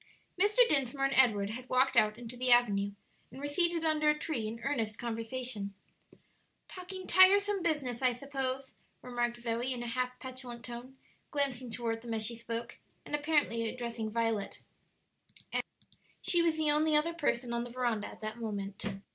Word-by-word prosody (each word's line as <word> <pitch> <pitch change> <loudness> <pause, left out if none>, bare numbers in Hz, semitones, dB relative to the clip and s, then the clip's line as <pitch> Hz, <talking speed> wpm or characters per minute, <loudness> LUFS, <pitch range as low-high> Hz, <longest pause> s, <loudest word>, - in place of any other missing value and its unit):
Mr. 420 +6 +5
Dinsmore 275 - +2
and 275 - +1
Edward 210 -6 +4
had 255 +3 -8
walked 260 +1 +3
out 215 0 +4
into 240 0 -8
the 250 0 +1
avenue, 205 -5 +4 0.4
and 260 - -11
were 285 - -4
seated 335 +2 +1
under 305 -1 +3
a 300 - +3
tree 295 -8 -2
in 225 +2 -6
earnest 225 -7 -1
conversation. 230 -3 -3 0.9
"Talking 370 0 -8
tiresome 395 +2 +5
business, 285 -8 -1
I 255 -1 +4
suppose," 265 0 -3 0.3
remarked 240 -1 -1
Zoe, 240 +2 -2
in 245 -2 -3
a - - -4
half 250 +1 -2
petulant 255 -2 -7
tone, 245 +2 -8 0.3
glancing 265 -4 -2
toward 225 0 -2
them 230 -1 -3
as 220 -1 +1
she 235 +2 -3
spoke, 230 0 -5 0.3
and - - -9
apparently 290 -7 +1
addressing 235 -3 -4
Violet, 225 -2 -1 0.9
as - - +2 0.6
she 345 - +4
was 330 -2 +2
the 310 -1 +2
only 305 +1 +3
other 315 +3 +3
person 245 -7 0
on 235 0 0
the 245 - -7
veranda 240 -4 -1
at - - -12
the 215 0 -3
moment. 205 -2 -4
250 Hz, 170 wpm, -32 LUFS, 230-295 Hz, 0.9 s, Mr